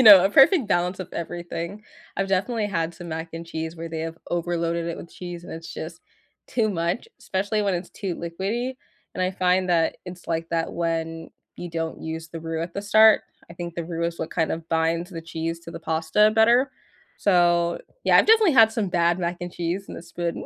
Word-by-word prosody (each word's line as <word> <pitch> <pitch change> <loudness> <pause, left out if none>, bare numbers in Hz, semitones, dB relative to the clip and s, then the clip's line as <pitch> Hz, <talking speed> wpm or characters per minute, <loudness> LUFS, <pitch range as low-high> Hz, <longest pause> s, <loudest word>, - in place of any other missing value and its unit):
you - - +7
know, 200 -5 +10
a 195 - +3
perfect 270 - +6
balance 180 0 +1
of 185 - -6
everything, 175 +3 -5 0.3
I've 195 0 0
definitely 205 +4 0
had 170 -4 -2
some 175 +1 -9
mac 160 +1 -4
and 165 +1 -7
cheese 160 0 -5
where 165 0 -6
they 160 -1 -4
have 165 0 -4
overloaded 170 -1 -1
it 170 - -3
with 170 - -10
cheese 175 -1 -7
and - - -8
it's 165 +1 -8
just - - -7 0.5
too 225 -3 +1
much, 175 - -2
especially 205 +3 -1
when 200 -2 +1
it's 175 +1 -4
too 190 -4 -4
liquidy. 200 +10 -3 0.4
And 185 - -1
I 185 - +1
find 185 0 +1
that 165 -2 +2
it's 180 -1 -9
like 165 0 -2
that 165 -1 -1
when 165 -1 -2 0.3
you 175 - -6
don't 165 -1 -4
use 160 +1 -5
the 165 -1 -7
roux 165 0 -3
at 170 +1 -5
the 200 - -3
start. 215 +1 +6 0.3
I - - -7
think 175 -1 -6
the 170 - -3
roux 170 0 -3
is 170 0 -5
what 160 - -4
kind 160 -2 0
of 165 0 -4
binds 165 +2 +1
the 165 - -6
cheese 165 0 -4
to 170 - -10
the 165 - -7
pasta 165 +6 +3
better. 240 +4 +5 0.5
So, 175 -3 +3 0.3
yeah, - - +6
I've - - +6
definitely 440 -5 +6
had 225 -3 +7
some 220 -4 -1
bad 170 0 +2
mac 175 0 -1
and 175 0 -5
cheese 175 +3 -2
in - - -7
this 170 0 -10
food. 170 -1 -2
170 Hz, 220 wpm, -24 LUFS, 165-195 Hz, 0.5 s, know